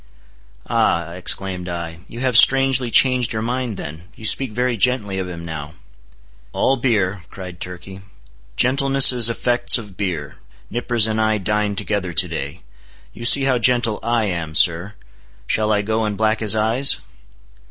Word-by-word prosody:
"Ah," 85 0 -1
exclaimed 90 0 -1
I, 85 -1 -7
"you 120 - -10
have 130 -2 -1
strangely 135 0 +4
changed 125 0 +2
your 110 0 -4
mind 120 -3 -4
then—you 90 +9 -10
speak 130 +2 +4
very 125 +2 -2
gently 105 -4 -1
of 90 -1 -5
him 85 -1 -9
now." 80 -1 -8 0.8
"All 135 - +1
beer," 105 -7 -1
cried 90 -2 -11
Turkey; 90 +2 -10 0.5
"gentleness 135 +1 +4
is 120 -2 +3
effects 120 +2 +2
of 105 -6 -11
beer—Nippers 105 - -3
and 110 0 -2
I 110 0 0
dined 105 0 -2
together 95 -4 -3
to - - +3
day. 70 +6 -7 0.5
You 115 - -9
see 135 +3 +7
how 130 -2 +1
gentle 120 -2 +2
I 115 -1 -1
am, 85 -5 -5
sir. 85 +6 +2 0.5
Shall 110 - -1
I 105 -1 0
go 110 +2 -2
and 105 -2 -3
black 110 0 0
his 110 -1 +3
eyes?" 115 +6 +4
110 Hz, 155 wpm, -19 LUFS, 90-120 Hz, 0.8 s, see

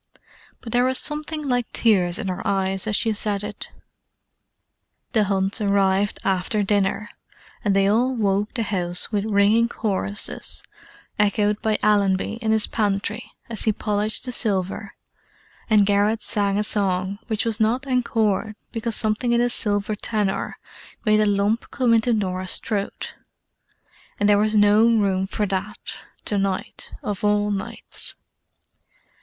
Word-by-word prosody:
But 225 - -8
there 245 +2 +3
was 260 0 +2
something 300 0 -2
like 245 -2 0
tears 185 -6 +3
in 220 -3 -3
her 185 -1 -3
eyes 195 0 0
as 215 - +1
she 225 +2 +1
said 205 -1 -1
it. 210 -1 -7 1.4
The 220 -4 +3
Hunts 195 +2 +1
arrived 200 0 +2
after 195 +3 +1
dinner, 205 +1 0 0.5
and 205 -3 +2
they 195 0 +4
all 245 +5 +2
woke 205 0 0
the 230 - 0
house 180 -3 -1
with 205 -1 0
ringing 215 +2 +3
choruses—echoed 210 0 -2
by 215 -1 +1
Allenby 205 +1 +2
in 220 - -1
his 220 -1 +3
pantry, 205 -1 -2 0.2
as 225 -2 -3
he 220 - +4
polished 210 +2 -2
the 250 - -3
silver; 200 -3 -1 0.7
and 210 -2 +5
Garrett 205 +2 +2
sang 200 -1 0
a 210 - +1
song 195 -2 0
which 220 -2 -1
was 225 -1 0
not 235 +5 +1
encored 225 -5 0 0.2
because 225 -1 -2
something 220 +2 +1
in 235 - +3
his 240 0 +2
silver 205 0 0
tenor 210 -2 -2 0.5
made 215 -1 +4
a 210 - +3
lump 205 +3 +1
come 250 -3 +2
into 230 +2 +3
Norah's 185 -4 +1
throat; 205 -2 -3 1.1
and 205 - +3
there 205 -1 +5
was 215 +1 +1
no 205 +1 +5
room 200 -5 +2
for 210 +1 -1
that, 195 +2 -4 0.3
to 205 - 0
night, 195 -1 -3
of 205 -1 -4
all 210 0 +2
nights. 195 -1 -4
210 Hz, 145 wpm, -23 LUFS, 200-220 Hz, 1.4 s, and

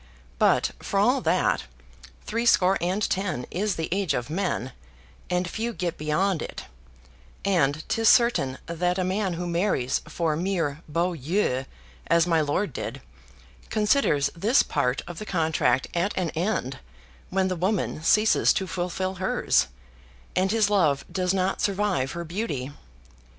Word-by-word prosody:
But, - - +3
for - - -1
all - - +3
that, - - +1 0.6
threescore 215 -4 +3
and 185 +4 0
ten 185 -10 -2
is 205 +2 -1
the 160 - -2
age 195 -2 0
of 120 +5 -3
men, 165 - -2 0.6
and 180 0 0
few 230 +5 -3
get 180 -4 -3
beyond 155 +4 0
it; - - -6 0.8
and 155 -6 +1
'tis 225 -1 +3
certain 235 - +3
that 180 +2 -1
a 185 - +1
man 190 0 -1
who 175 +1 -4
marries 170 -7 0
for 165 -3 -1
mere 165 -4 -1
beaux 170 +4 0
yeux, 150 -3 -1 0.4
as 170 0 +4
my 165 -2 +2
lord 150 +3 -1
did, - - -5 0.7
considers 210 - +2
this 215 +10 +3
part 130 -3 -1
of 175 -2 -7
the 215 - -6
contract 160 -6 +1
at 175 +4 -1
an 180 -3 0
end 165 - -2 0.5
when 190 0 +1
the 185 - -1
woman 185 -2 -1
ceases 215 +6 +4
to 190 - -1
fulfil 185 +1 -3
hers, 190 - +2 0.7
and 185 +1 +2
his 220 0 +3
love 170 -9 +2
does 180 -1 0
not 190 0 0
survive 195 -10 0
her 170 0 -4
beauty. 155 - -3
180 Hz, 145 wpm, -25 LUFS, 155-195 Hz, 0.8 s, as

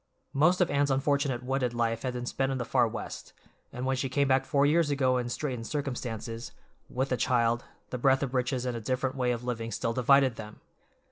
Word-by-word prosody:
Most 175 +6 +3
of 175 - +2
Anne's 145 0 +2
unfortunate 135 -2 +1
wedded 125 -2 -1
life 115 -1 0
had 130 -2 -2
been 125 0 -4
spent 135 +2 -1
in 135 - -1
the 120 - -3
far - - +3
West, - - -7 0.4
and 125 +1 -5
when 135 0 +1
she 130 +1 -2
came 140 +2 +1
back 135 0 +3
four 140 0 +2
years 155 +1 +3
ago 130 -3 +2
in 120 0 -3
straitened 125 -3 -3
circumstances, 120 -5 -4 0.4
with 130 +2 -1
the 125 - 0
child, 120 -2 +1 0.3
the 125 - -3
breadth 135 +2 +3
of 135 -2 -3
riches 125 0 0
and 125 -1 -2
a 115 - -4
different 130 +3 -1
way 125 -2 +1
of 120 0 -3
living 115 -2 -3
still 115 - -1
divided 130 0 +4
them. 105 -1 -9
130 Hz, 215 wpm, -29 LUFS, 120-135 Hz, 0.4 s, divided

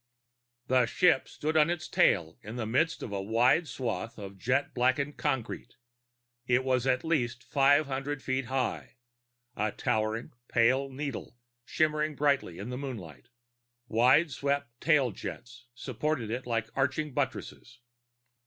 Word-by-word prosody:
The 125 -1 +3
ship 175 -3 +3
stood 155 +1 -3
on 155 0 +5
its 175 -1 -2
tail 80 -3 +2
in 110 +3 -8
the 120 -2 -3
midst 140 +9 +1
of - - -6
a 100 -1 -2
wide, 120 - +3
flat - - -14
swath 120 -3 -4
of 100 -2 -9
jet 125 +8 0
blackened 130 +4 +1
concrete. 135 -6 -3 0.7
It 125 +1 +3
was 130 -1 +1
at 130 -1 +2
least 125 -7 -1
five 140 +4 +4
hundred 135 +1 -4
feet 130 0 -1
high, 130 0 -2 0.6
a 105 +1 0
towering 110 +3 -1 0.2
pale 130 +4 +3
needle 135 -2 -6 0.3
shimmering 155 -1 +1
brightly 140 - +1
in 105 +6 -6
the 125 - -4
moonlight. 100 - -7 0.6
Wideswept 140 +3 +2
tailjets 120 - -1
supported 130 -1 -2
it 125 +2 -4
like 115 -2 -1
arching 140 +2 0
buttresses. 130 -3 -4
130 Hz, 135 wpm, -29 LUFS, 115-140 Hz, 0.7 s, on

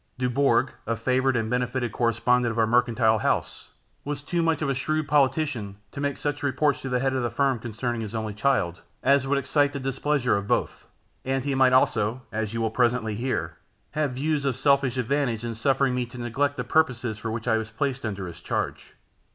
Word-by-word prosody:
Dubourg, 130 0 +2 0.2
a 115 - 0
favoured 130 +3 +1
and 115 -2 0
benefited 125 0 -1
correspondent 120 +1 +2
of 115 - -6
our 110 - +4
mercantile 115 -1 +3
house, - - -1 0.3
was 145 0 -4
too 170 +3 -1
much 165 -2 +1
of - - 0
a - - +2
shrewd 155 +3 -1
politician 135 -7 +1 0.2
to 140 - -6
make 140 -1 -1
such 145 -1 -3
reports 145 +1 +1
to 135 - -4
the 125 - +1
head 135 +1 0
of 130 - 0
the 120 - 0
firm 135 0 +1
concerning 120 +1 -3
his 110 0 -5
only 110 -1 -3
child, 105 -7 0 0.2
as 140 -1 +3
would 140 +1 +2
excite 145 +1 +1
the 140 - -3
displeasure 135 0 0
of 100 0 -2
both; - - -1 0.4
and 135 0 -1
he 140 0 -1
might 130 -1 +4
also, 125 -1 +2
as 110 -1 -2
you 115 - -3
will 110 -1 0
presently 120 -2 +1
hear, 125 +5 -2 0.3
have 150 -4 -1
views 145 +2 -1
of 135 -3 0
selfish 135 -1 +2
advantage 125 -2 0
in 115 - -3
suffering 135 +3 +1
me 125 -1 -1
to 125 - -11
neglect 135 +4 -1
the 125 - -1
purposes 125 -5 +1
for 115 - -4
which 110 +1 -4
I 110 -1 +3
was 110 0 -4
placed 130 +4 -2
under 100 -4 -3
his 85 - -9
charge. - - -3
125 Hz, 210 wpm, -25 LUFS, 115-140 Hz, 0.4 s, our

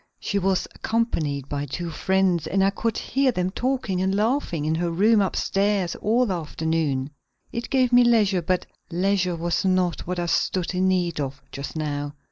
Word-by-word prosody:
She 200 - -1
was 190 -1 +1
accompanied 155 - -1
by 145 0 -3
two 170 +5 -4
friends 190 0 +1
and 195 0 +2
I 195 - +3
could 225 +2 -2
hear 270 -1 +1
them 180 -4 -1
talking 240 -6 -1
and 190 +1 +1
laughing 210 - 0
in 155 - +1
her 170 +1 0
room 205 +6 +4
upstairs 195 -1 0
all 235 +4 +2
the 200 - -1
afternoon. 155 -4 -1 0.4
It 235 - -4
gave 255 -2 +2
me 245 0 +7
leisure, 210 -6 +3
but 180 +2 0 0.2
leisure 180 0 +1
was 170 0 -1
not 185 -3 +1
what 180 0 -2
I 175 - -1
stood 180 +1 0
in 185 +1 +1
need 180 -3 0
of, 140 0 -3
just 140 +3 -6
now. 145 -2 -3
185 Hz, 180 wpm, -24 LUFS, 165-205 Hz, 0.4 s, me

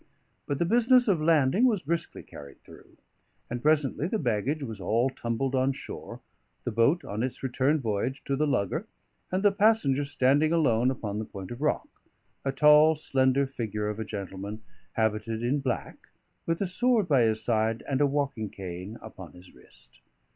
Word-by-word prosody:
But 140 - -1
the 170 - +1
business 245 +5 +4
of 180 -7 +2
landing 160 - +3
was 220 -7 +2
briskly 165 +4 -3
carried 70 -1 -12
through; - - -17 0.5
and 120 0 -3
presently 150 0 +1
the 220 - -1
baggage 135 - -1
was 110 -6 -7
all 120 +6 +1
tumbled 125 +2 -2
on 130 +1 +2
shore, - - -9 0.4
the 120 - -2
boat 115 +10 +2
on 105 +2 -4
its 130 +2 -4
return 135 +4 +1
voyage 120 +3 -2
to 140 - -1
the 150 +2 +1
lugger, 110 -9 -1 0.4
and 185 +2 0
the 205 - +5
passenger 200 -10 +3
standing 140 +2 +2
alone 125 -7 +3
upon 105 -5 -4
the 110 - -3
point 95 -1 -9
of 120 +3 -7
rock, 150 - 0 0.6
a 135 - 0
tall 150 +3 +6
slender 135 -2 +1
figure 110 -6 -4
of 105 +1 -5
a - - -1
gentleman, 100 0 -6 0.3
habited 110 +1 -1
in 130 +5 +1
black, 130 -3 -3 0.5
with 165 +2 -1
a - - +2
sword 220 +2 +1
by 140 -6 +4
his 110 -1 +1
side 110 -1 0
and 135 0 0
a 145 - +5
walking 140 -6 -2
cane 95 +3 -7
upon 95 -6 -11
his 90 +1 -16
wrist. 60 -1 -18
130 Hz, 175 wpm, -27 LUFS, 110-155 Hz, 0.6 s, tall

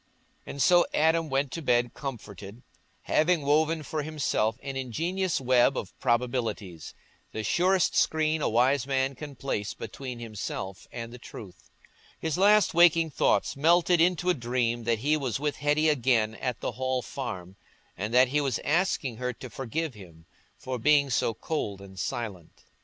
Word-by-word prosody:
And 140 - -7
so 175 +3 +5
Adam 160 +1 +2
went 135 0 0
to 165 - -5
bed 120 -4 +1
comforted, 110 -5 -8 0.4
having 160 0 +2
woven 155 +2 +2
for 155 +1 -3
himself 140 -7 -1
an 135 -1 -5
ingenious 165 - -1
web 130 +1 +3
of 95 - -5
probabilities—the 115 - -3
surest 185 - +2
screen 155 0 +2
a - - +1
wise 125 +4 +2
man 135 0 0
can 145 +1 -9
place 105 -6 -3
between 125 +3 -7
himself 105 -4 -6
and 115 0 -7
the 125 - -10
truth. 100 -5 -12 0.5
His 160 -2 -2
last 205 +3 +4
waking 165 -1 +5
thoughts - - +1
melted 170 +3 +4
into 180 +1 +2
a - - +2
dream 120 -3 -1
that 115 0 +2
he 145 +7 +1
was 130 -5 -2
with 145 0 -2
Hetty 150 +2 +2
again 120 -6 +2
at 125 +2 -4
the - - -2
Hall 130 -1 -2
Farm, 95 -9 -6 0.4
and 105 +4 -4
that 125 +1 +5
he 145 +3 +1
was 135 -4 0
asking 150 -7 0
her 125 +1 -2
to 130 -1 -10
forgive 135 +4 -3
him 85 -6 -14 0.3
for 130 -1 -5
being 140 +1 +3
so 115 -2 +1
cold 105 -11 -3
and 95 -1 -11
silent. 100 -9 -5
130 Hz, 160 wpm, -27 LUFS, 115-155 Hz, 0.5 s, so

